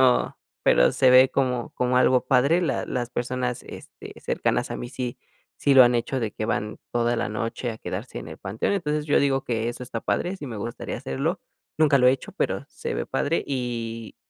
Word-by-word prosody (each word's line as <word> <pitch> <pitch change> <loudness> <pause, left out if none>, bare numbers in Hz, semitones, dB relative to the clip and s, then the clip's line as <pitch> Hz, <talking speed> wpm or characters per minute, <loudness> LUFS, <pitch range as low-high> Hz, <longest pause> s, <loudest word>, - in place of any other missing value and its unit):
pero 125 -1 +3 0.3
pero - - +5
se 130 - +4
ve 130 +1 +7
como 125 -3 0
como 125 0 0
algo 125 0 +4
padre, 140 +7 +4
la 175 - -1
las 125 -2 -3
personas, 125 0 -2
este, - - -11
cercanas - - -1
a - - -3
mí 120 - -6
sí 125 -2 -4 0.4
sí, 140 - +2
lo 135 -1 +9
han 120 0 +4
hecho 120 +3 -1
de 110 -3 -2
que 110 - -4
van 105 -1 -2
toda 120 0 +1
la 105 - -1
noche 115 +3 -3
a 110 - -7
quedarse - - -5
en - - -8
el - - -8
panteón. 105 - -2
Entonces, 150 -5 -1
yo 145 - +4
digo 135 -1 +1
que 115 -1 -1
eso 120 - -8
está 120 -2 -5
padre, 185 +2 -1
sí 150 - -8
me 115 -5 -6
gustaría 115 +3 -5
hacerlo, 65 - -2 0.4
nunca 155 -3 +5
lo 125 -2 +4
he - - +8
hecho, 135 - -5
pero - - -2
se - - -5
ve - - -3
padre, 160 +4 0
y 115 -4 -4
125 Hz, 215 wpm, -25 LUFS, 115-135 Hz, 0.4 s, lo